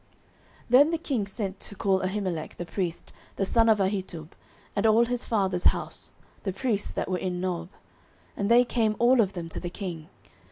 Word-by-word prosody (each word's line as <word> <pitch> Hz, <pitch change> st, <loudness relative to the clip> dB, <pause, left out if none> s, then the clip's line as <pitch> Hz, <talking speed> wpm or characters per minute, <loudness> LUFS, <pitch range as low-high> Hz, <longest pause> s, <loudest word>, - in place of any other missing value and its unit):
09:022:011 -, -, -35 dB, 0.6 s
Then 280 Hz, +5 st, +7 dB
the 330 Hz, -, 0 dB
king 260 Hz, -10 st, -2 dB
sent 195 Hz, -2 st, -4 dB
to 205 Hz, -, -5 dB
call 195 Hz, -1 st, +2 dB
Ahimelech 185 Hz, -4 st, -3 dB
the 175 Hz, -, -4 dB
priest, 175 Hz, -2 st, -4 dB, 0.2 s
the 195 Hz, -, 0 dB
son 230 Hz, +3 st, +3 dB
of 220 Hz, -, +5 dB
Ahitub, 190 Hz, -5 st, -2 dB, 0.5 s
and 210 Hz, +1 st, +2 dB
all 225 Hz, +2 st, +5 dB
his 245 Hz, +1 st, -2 dB
father's 190 Hz, -5 st, 0 dB
house, -, -, 0 dB, 0.3 s
the 195 Hz, -, -2 dB
priests 205 Hz, +1 st, -1 dB
that -, -, -3 dB
were 185 Hz, -1 st, -1 dB
in 180 Hz, -1 st, -2 dB
Nob: 175 Hz, -2 st, -3 dB, 0.7 s
and 200 Hz, +1 st, -1 dB
they 240 Hz, +1 st, +6 dB
came 225 Hz, -3 st, +1 dB
all 240 Hz, +1 st, +5 dB
of 200 Hz, -2 st, 0 dB
them 170 Hz, -2 st, -5 dB
to -, -, -6 dB
the 175 Hz, -, -4 dB
king. 175 Hz, -4 st, -6 dB
200 Hz, 195 wpm, -27 LUFS, 180-230 Hz, 0.7 s, Then